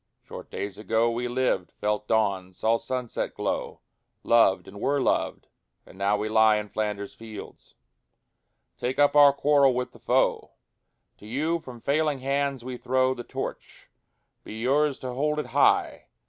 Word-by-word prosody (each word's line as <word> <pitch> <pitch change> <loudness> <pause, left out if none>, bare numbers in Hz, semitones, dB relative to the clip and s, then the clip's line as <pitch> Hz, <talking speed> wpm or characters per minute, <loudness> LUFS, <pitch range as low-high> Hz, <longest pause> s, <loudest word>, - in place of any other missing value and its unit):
Short - - -10
days 100 0 -5
ago 115 +2 +1
We 120 +1 -2
lived, 125 -7 -1
felt 105 0 -2
dawn, 100 -4 0
saw 115 +4 +1
sunset 125 -2 -4
glow, - - -3 0.4
Loved, 115 -5 +3
and 100 +2 -11
were 140 +1 +1
loved, - - 0 0.4
and - - -16
now 100 +2 +1
we 105 +1 -2
lie 110 0 +5
In 105 -1 -3
Flanders 105 -2 -3
fields. 110 -2 -11 1.0
Take 125 +2 -2
up 145 0 +4
our 145 -1 +8
quarrel 140 -2 +3
with 125 0 -2
the - - -17
foe: - - +1 0.7
To 105 - -13
you 155 +8 -1
from 125 -6 -11
failing 150 +2 +1
hands 140 -1 -1
we 130 -1 -5
throw 130 +1 +1
The 120 - -7
Torch: - - -7 0.5
be - - -9
yours 140 +4 +2
to 125 -1 -6
hold 150 +4 0
it 150 - -2
high! - - +2
120 Hz, 160 wpm, -26 LUFS, 105-140 Hz, 1.0 s, our